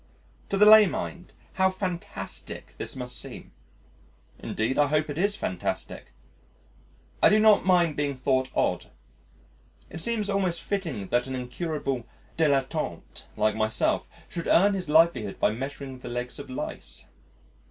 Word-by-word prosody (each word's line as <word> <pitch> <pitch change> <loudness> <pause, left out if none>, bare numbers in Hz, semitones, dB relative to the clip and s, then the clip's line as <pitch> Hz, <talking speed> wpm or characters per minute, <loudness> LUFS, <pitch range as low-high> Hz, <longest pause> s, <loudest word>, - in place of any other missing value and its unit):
To 200 - 0
the 210 - +6
lay 215 -1 +9
mind 175 0 -5 0.2
how 190 0 +3
fantastic 185 -2 -5
this - - -4
must 125 -1 -5
seem! - - -9 0.9
Indeed, 115 +6 -2
I 145 - +5
hope 150 +1 0
it 145 - -6
is 200 +2 +2
fantastic. 90 - -4 1.1
I - - +7
do 210 - +5
not 215 -3 +5
mind 175 -4 +3
being 145 -2 -1
thought 130 0 +1
odd. - - 0 1.0
It - - -6
seems 220 0 0
almost 190 -4 0
fitting 165 - -3
that 120 +1 +1
an 130 - -4
incurable 130 -1 -3 0.3
dilettante 140 - -1
like 110 0 +2
myself 110 0 0 0.2
should 170 - -5
earn 200 +4 +5
his 185 -5 -4
livelihood 150 -10 +3
by - - +3
measuring 135 +2 -6
the - - -8
legs 125 +2 -4
of 140 - -9
lice. 130 - -6
150 Hz, 140 wpm, -27 LUFS, 130-185 Hz, 1.1 s, lay